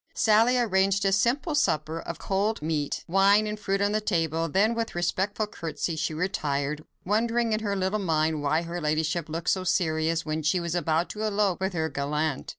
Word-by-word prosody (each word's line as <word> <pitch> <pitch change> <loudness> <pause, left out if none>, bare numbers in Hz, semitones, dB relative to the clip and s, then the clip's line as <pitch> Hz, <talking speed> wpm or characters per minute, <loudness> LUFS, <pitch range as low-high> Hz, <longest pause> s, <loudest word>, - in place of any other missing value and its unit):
Sally 225 +3 +4
arranged 195 -3 +2
a 195 - +3
simple 245 - +1
supper 160 - 0
of 170 - -6
cold 200 0 -1
meat, 155 -2 -2
wine, 195 +4 +4
and 210 0 -4
fruit 195 -1 -1
on 205 0 +2
the 215 +1 0
table, 165 -5 0
then 205 +8 +2
with 230 -1 -2
a - - -14
respectful 190 +5 -1
curtsey, 165 -5 -4
she 160 - -2
retired, 150 -4 -2 0.2
wondering 230 +3 +1
in 215 - +1
her 205 -2 -2
little 190 +2 0
mind 160 -4 0
why 155 +3 +1
her 170 +1 -5
ladyship 155 +2 -1
looked 165 +2 -1
so 185 - 0
serious, 165 -2 0
when 155 0 -2
she 155 +4 +1
was 170 -1 -3
about 170 -1 +1
to 210 - -7
elope 205 -3 +1
with 190 0 -1
her 160 -2 0
gallant. 150 0 -2
180 Hz, 195 wpm, -26 LUFS, 160-210 Hz, 0.2 s, Sally